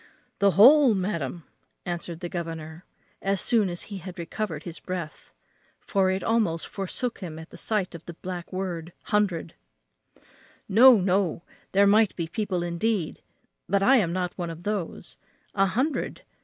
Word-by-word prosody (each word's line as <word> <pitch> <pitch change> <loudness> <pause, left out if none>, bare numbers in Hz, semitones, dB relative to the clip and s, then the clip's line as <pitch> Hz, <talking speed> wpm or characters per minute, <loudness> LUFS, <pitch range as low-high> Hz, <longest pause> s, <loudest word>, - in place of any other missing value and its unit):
"The 200 0 +5
whole, 260 +2 +8
madam!" 170 -5 -3 0.4
answered 170 -1 -5
the 175 - -3
governor, 165 -1 -6 0.4
as 195 0 0
soon 220 -1 +3
as 175 0 -3
he 200 -2 -7
had 185 +1 -9
recovered 170 -2 -4
his 170 -2 -7
breath, 175 -4 -6 0.5
for 195 -2 +1
it 190 +1 -1
almost 210 -8 +1
forsook 210 +5 -3
him 165 -5 -7
at 160 +1 -10
the - - -11
sight 210 -4 -1
of 170 -1 -9
the 170 - -7
black 180 0 -7
word 180 -3 -4 0.2
hundred 200 -6 +1 1.1
"No, 240 +3 +8
no; 185 -2 +1 0.3
there 200 +1 +5
might 210 +1 +4
be 170 - -2
people 185 -1 -2
indeed 175 +1 -1 0.5
but 195 +1 +2
I 265 +5 +6
am 185 -8 +1
not 180 0 -2
one 175 -1 -2
of 165 +1 -8
those. 205 -4 -4 0.4
A 195 -1 +3
hundred! 260 +10 -1
185 Hz, 155 wpm, -26 LUFS, 170-205 Hz, 1.1 s, whole